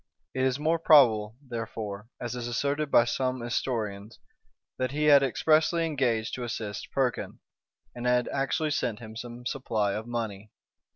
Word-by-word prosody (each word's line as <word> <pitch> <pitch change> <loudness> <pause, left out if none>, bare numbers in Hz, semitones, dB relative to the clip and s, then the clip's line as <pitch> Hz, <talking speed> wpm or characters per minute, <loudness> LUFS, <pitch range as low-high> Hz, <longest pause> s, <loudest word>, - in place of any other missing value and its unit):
It 130 - -1
is 130 0 +2
more 160 +3 +1
probable, 115 -9 +5
therefore, 110 -3 -5
as 120 -1 -4
is 120 -1 -4
asserted 140 +5 -1
by 120 - +5
some 130 +1 -1
historians, 110 -3 -3 0.6
that 130 0 0
he 150 +1 -1
had 145 -2 +7
expressly 155 +5 +2
engaged 125 -8 0
to 125 - -4
assist 105 -4 -5
Perkin, 130 -3 -1 0.6
and 120 0 -4
had 125 0 +2
actually 150 +3 0
sent 120 -7 -1
him 110 -1 -10
some 120 +1 -8
supply 110 -7 -1
of 110 +3 -5
money. 110 -3 -4
120 Hz, 155 wpm, -28 LUFS, 110-135 Hz, 0.6 s, had